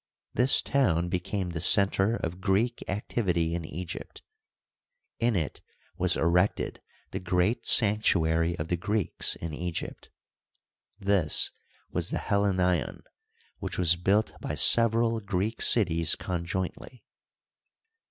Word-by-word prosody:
This 125 Hz, +4 st, +4 dB
town 90 Hz, -12 st, 0 dB
became 90 Hz, +1 st, -4 dB
the 80 Hz, -1 st, -5 dB
center 100 Hz, +4 st, +4 dB
of 90 Hz, -3 st, -6 dB
Greek 110 Hz, +6 st, -1 dB
activity 90 Hz, -4 st, -2 dB
in 85 Hz, -1 st, -4 dB
Egypt. 80 Hz, +2 st, -9 dB, 1.0 s
In 115 Hz, -1 st, 0 dB
it 80 Hz, -6 st, -4 dB, 0.3 s
was -, -, 0 dB
erected 90 Hz, +4 st, -1 dB, 0.3 s
the -, -, -5 dB
great 90 Hz, +6 st, -1 dB
sanctuary 85 Hz, -6 st, +2 dB
of 75 Hz, -, -6 dB
the 90 Hz, -, -1 dB
Greeks 105 Hz, +1 st, 0 dB
in 85 Hz, -2 st, -7 dB
Egypt; 85 Hz, +2 st, -6 dB, 0.9 s
this 95 Hz, -6 st, +3 dB, 0.4 s
was -, -, -2 dB
the -, -, -3 dB
Helleneion, 95 Hz, -6 st, -1 dB, 0.6 s
which -, -, -6 dB
was 85 Hz, -2 st, +3 dB
built 100 Hz, +5 st, 0 dB
by -, -, -5 dB
sev 115 Hz, -1 st, +6 dB
eral 115 Hz, -1 st, -1 dB
Greek 100 Hz, +3 st, -3 dB
cities 85 Hz, -7 st, +3 dB
conjointly. 90 Hz, +7 st, -6 dB
90 Hz, 115 wpm, -26 LUFS, 85-105 Hz, 1.0 s, sev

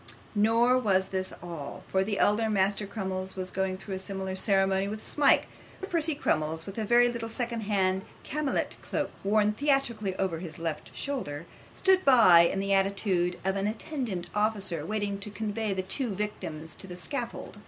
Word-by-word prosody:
Nor 230 Hz, +4 st, +4 dB
was 190 Hz, -5 st, +1 dB
this 185 Hz, -1 st, -2 dB
all, 165 Hz, -5 st, -7 dB
for 190 Hz, 0 st, +1 dB
the 205 Hz, 0 st, -2 dB
elder 220 Hz, +2 st, +3 dB
Master 200 Hz, 0 st, +1 dB
Crummles 190 Hz, -2 st, -4 dB
was 185 Hz, -1 st, -4 dB
going 190 Hz, 0 st, -1 dB
through 195 Hz, +1 st, -7 dB
a 190 Hz, -, -3 dB
similar 190 Hz, 0 st, -4 dB
ceremony 195 Hz, 0 st, +2 dB
with 215 Hz, +1 st, -6 dB
Smike; 290 Hz, -2 st, +4 dB
while -, -, -20 dB
Master 385 Hz, -, -6 dB
Percy 325 Hz, -2 st, +3 dB
Crummles, 160 Hz, -, 0 dB
with 195 Hz, +3 st, -6 dB
a 220 Hz, -, -1 dB
very 240 Hz, +2 st, +5 dB
little 235 Hz, -2 st, -3 dB
second 235 Hz, 0 st, -3 dB
hand 190 Hz, -2 st, +1 dB, 0.2 s
camlet 300 Hz, -1 st, -1 dB
cloak, -, -, -2 dB
worn 210 Hz, +1 st, +3 dB
theatrically 235 Hz, -7 st, +1 dB
over 185 Hz, -4 st, -1 dB
his 165 Hz, -4 st, -7 dB
left 165 Hz, -2 st, -4 dB
shoulder, 170 Hz, -, -4 dB, 0.3 s
stood 380 Hz, -1 st, +4 dB
by, 230 Hz, -, +7 dB
in 195 Hz, -, -2 dB
the 195 Hz, 0 st, 0 dB
attitude 195 Hz, -2 st, +1 dB
of 190 Hz, 0 st, +1 dB
an 195 Hz, +1 st, 0 dB
attendant 220 Hz, -, -3 dB
officer, 210 Hz, -6 st, 0 dB
waiting 205 Hz, +2 st, -2 dB
to 200 Hz, -, -6 dB
convey 215 Hz, 0 st, -2 dB
the 190 Hz, -1 st, -1 dB
two 240 Hz, +7 st, 0 dB
victims 160 Hz, -6 st, -5 dB
to 190 Hz, -, -9 dB
the 180 Hz, -1 st, -8 dB
scaffold. 235 Hz, -2 st, -3 dB
200 Hz, 180 wpm, -28 LUFS, 190-225 Hz, 0.3 s, by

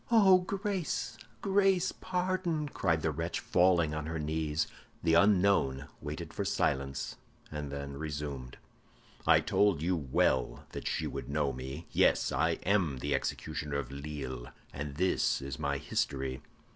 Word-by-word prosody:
"Oh, 200 Hz, -5 st, +7 dB
grace, 195 Hz, -2 st, -2 dB, 0.3 s
grace, 195 Hz, -2 st, +3 dB
pardon!" 180 Hz, -4 st, -1 dB
cried 80 Hz, -, 0 dB
the 80 Hz, -, +2 dB
wretch, 80 Hz, +3 st, -2 dB
falling 90 Hz, -4 st, +3 dB
on 75 Hz, 0 st, -3 dB
her 80 Hz, +1 st, -3 dB
knees. 75 Hz, 0 st, 0 dB, 0.4 s
The 80 Hz, -1 st, +3 dB
unknown 90 Hz, -7 st, +4 dB
waited 75 Hz, +1 st, -5 dB
for -, -, -2 dB
silence, 70 Hz, 0 st, -1 dB, 0.3 s
and 75 Hz, -2 st, -4 dB
then 70 Hz, 0 st, -5 dB
resumed, 70 Hz, -4 st, -5 dB, 0.7 s
"I -, -, +7 dB
told 100 Hz, -7 st, +2 dB
you 90 Hz, +2 st, +2 dB
well 65 Hz, -4 st, +1 dB
that -, -, -5 dB
she -, -, -1 dB
would -, -, -5 dB
know 70 Hz, -2 st, +1 dB
me. 65 Hz, +6 st, -6 dB
Yes, -, -, +3 dB
I 80 Hz, +3 st, +2 dB
am 90 Hz, -9 st, +2 dB
the 70 Hz, +3 st, -1 dB
executioner 75 Hz, -1 st, -2 dB
of 65 Hz, -3 st, -4 dB
Lille, 70 Hz, -3 st, -5 dB, 0.3 s
and 70 Hz, 0 st, -5 dB
this 90 Hz, +4 st, +2 dB
is 70 Hz, +1 st, -6 dB
my 70 Hz, -2 st, 0 dB
history." 70 Hz, -3 st, -2 dB
75 Hz, 145 wpm, -31 LUFS, 70-95 Hz, 0.7 s, Oh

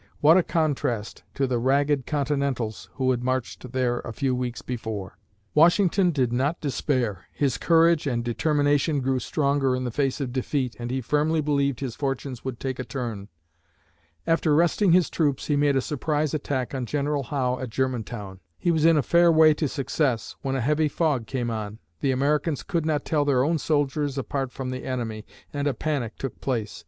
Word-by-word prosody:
What 155 Hz, +3 st, +6 dB
a 185 Hz, -, +6 dB
contrast 145 Hz, -10 st, -1 dB
to 140 Hz, -, +1 dB
the 125 Hz, -2 st, 0 dB
ragged 140 Hz, +2 st, +1 dB
Continentals 140 Hz, -6 st, -2 dB
who 130 Hz, -2 st, +1 dB
had 120 Hz, -1 st, -1 dB
marched 130 Hz, -1 st, -3 dB
there 125 Hz, -2 st, 0 dB
a -, -, -6 dB
few 130 Hz, +3 st, -1 dB
weeks 125 Hz, -2 st, -3 dB
before! 110 Hz, -6 st, -5 dB, 0.3 s
Washington 180 Hz, +3 st, +4 dB
did 130 Hz, -7 st, 0 dB
not 140 Hz, +7 st, 0 dB
despair. 125 Hz, -, -1 dB
His 140 Hz, -4 st, -1 dB
courage 165 Hz, -2 st, +4 dB
and 120 Hz, -3 st, -1 dB
determination 145 Hz, +3 st, +1 dB
grew 130 Hz, 0 st, 0 dB
stronger 140 Hz, -2 st, +1 dB
in 130 Hz, -, -3 dB
the 125 Hz, -, -2 dB
face 135 Hz, +3 st, 0 dB
of 130 Hz, -4 st, -3 dB
defeat 130 Hz, -1 st, -1 dB
and 120 Hz, 0 st, -4 dB
he 130 Hz, +1 st, -1 dB
firmly 150 Hz, +5 st, +1 dB
believed 140 Hz, -3 st, 0 dB
his 125 Hz, -4 st, -4 dB
fortunes 135 Hz, -3 st, -3 dB
would 130 Hz, -3 st, -5 dB
take 130 Hz, -1 st, -4 dB
a -, -, -2 dB
turn. 115 Hz, -6 st, -5 dB, 1.0 s
After 165 Hz, -2 st, +2 dB
resting 175 Hz, +4 st, +3 dB
his 180 Hz, 0 st, +5 dB
troops, 145 Hz, -5 st, 0 dB
he 150 Hz, -, +1 dB
made 145 Hz, -1 st, +3 dB
a 135 Hz, -, +3 dB
surprise 150 Hz, +1 st, -1 dB
attack 140 Hz, -4 st, -2 dB
on 130 Hz, -3 st, -3 dB
General 145 Hz, +1 st, -1 dB
Howe 130 Hz, -2 st, -1 dB
at 130 Hz, -, -4 dB
Germantown. 115 Hz, -6 st, -3 dB, 0.2 s
He 175 Hz, -, +1 dB
was 160 Hz, -1 st, +2 dB
in 165 Hz, -1 st, +6 dB
a 145 Hz, -, +2 dB
fair 170 Hz, +3 st, +5 dB
way 155 Hz, -1 st, +6 dB
to 150 Hz, 0 st, -1 dB
success, 135 Hz, -3 st, -1 dB
when 135 Hz, 0 st, -2 dB
a 130 Hz, -, 0 dB
heavy 150 Hz, +5 st, +2 dB
fog 145 Hz, -6 st, 0 dB
came 120 Hz, -3 st, -2 dB
on. 110 Hz, -1 st, -4 dB, 0.2 s
The 140 Hz, -, 0 dB
Americans 145 Hz, +3 st, +1 dB
could 170 Hz, -5 st, -1 dB
not 150 Hz, -2 st, 0 dB
tell 150 Hz, -2 st, +1 dB
their 135 Hz, -3 st, +2 dB
own 160 Hz, +3 st, +1 dB
soldiers 145 Hz, -2 st, 0 dB
apart 135 Hz, 0 st, -2 dB
from 130 Hz, -1 st, -5 dB
the 130 Hz, -, -5 dB
enemy 115 Hz, -5 st, -4 dB, 0.3 s
and 145 Hz, 0 st, -1 dB
a 140 Hz, -, 0 dB
panic 135 Hz, -8 st, -2 dB
took 135 Hz, -, -6 dB
place. 115 Hz, -6 st, -2 dB
135 Hz, 190 wpm, -25 LUFS, 125-150 Hz, 1.0 s, What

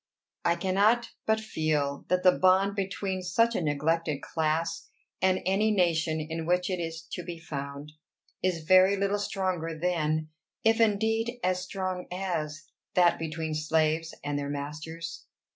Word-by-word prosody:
I 170 Hz, -1 st, +3 dB
cannot 200 Hz, +7 st, +2 dB, 0.2 s
but 220 Hz, 0 st, +3 dB
feel 155 Hz, -8 st, -1 dB
that 180 Hz, 0 st, +1 dB
the 185 Hz, -, +8 dB
bond 190 Hz, +2 st, +3 dB
between 195 Hz, -1 st, -2 dB
such 230 Hz, +6 st, +2 dB
a -, -, 0 dB
neglected 150 Hz, 0 st, 0 dB
class, 165 Hz, +1 st, -1 dB, 0.3 s
and 185 Hz, 0 st, +3 dB
any 195 Hz, +4 st, +2 dB
nation 165 Hz, -5 st, +2 dB
in 160 Hz, +1 st, -4 dB
which 180 Hz, +1 st, +1 dB
it 180 Hz, -, -1 dB
is 165 Hz, -1 st, -4 dB
to -, -, -4 dB
be 170 Hz, -1 st, -6 dB
found, 140 Hz, -2 st, -6 dB, 0.5 s
is 180 Hz, -3 st, 0 dB
very 185 Hz, +4 st, +6 dB
little 200 Hz, +1 st, 0 dB
stronger 185 Hz, -5 st, -2 dB
than, 155 Hz, -2 st, 0 dB, 0.3 s
if 225 Hz, +1 st, +4 dB
indeed 225 Hz, +3 st, +1 dB
as 185 Hz, 0 st, +1 dB
strong 185 Hz, -1 st, -4 dB
as, 155 Hz, -5 st, -3 dB, 0.3 s
that 175 Hz, -1 st, +4 dB
between 160 Hz, 0 st, -3 dB
slaves 155 Hz, +1 st, +1 dB
and 145 Hz, 0 st, -1 dB
their 140 Hz, 0 st, -3 dB
masters. 155 Hz, +4 st, -6 dB
170 Hz, 145 wpm, -28 LUFS, 155-190 Hz, 0.5 s, the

